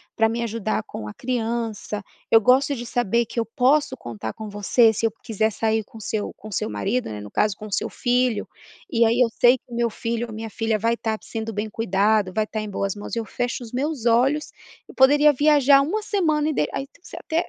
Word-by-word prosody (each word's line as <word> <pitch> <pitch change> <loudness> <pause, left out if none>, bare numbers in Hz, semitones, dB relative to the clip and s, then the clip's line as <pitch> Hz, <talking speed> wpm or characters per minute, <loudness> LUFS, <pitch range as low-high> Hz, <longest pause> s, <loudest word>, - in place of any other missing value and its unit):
pra 225 0 +3
me 235 +1 -2
ajudar 220 -1 -2
com 105 - -8
a 105 - -7
criança. 225 -4 -3 0.3
Eu 225 - +7
gosto 265 +5 +4
de 240 -1 -6
saber 235 0 +1
que 230 - -4
eu 225 - 0
posso 265 +6 +2
contar 110 -1 -6
com 215 -1 -8
você, 210 +3 +3
se 225 - -1
eu 225 - +2
quiser 220 0 0
sair 220 +1 0
com 225 - -13
seu 210 0 -3
com 215 0 -11
seu 175 - -2
marido, 200 - -2
né, 105 -1 -6
no 105 - -10
caso, 210 -2 +1
com 215 - -8
o - - -12
seu - - 0
filho. 245 -2 0 0.4
E 230 0 +4
aí 230 +2 +2
eu 235 - +4
sei 245 +2 +7
que 245 - -26
meu 235 0 +1
filho 230 +2 -3
ou 220 - -9
minha 220 +1 -6
filha 225 0 -1
vai 230 +2 +1
estar 220 -2 -2
sendo 225 -1 -5
bem 210 +2 -3
cuidado, 205 -2 +1
vai 215 +2 +1
estar 215 0 -4
em 215 - -5
boas 195 0 -2
mãos, 205 +3 -6
eu 230 - -2
fecho 245 +2 -3
os 225 - -10
meus 275 -1 -2
olhos 270 +5 +2 0.4
eu - - -11
poderia 290 +3 +6
viajar 285 -1 +5
1 395 +10 -1
semana", 315 -8 +1
e - - -1
daí 150 - +1
aí 275 - -3
tu - - -26
você - - -11
até 330 +2 -1
230 Hz, 235 wpm, -23 LUFS, 215-250 Hz, 0.4 s, Eu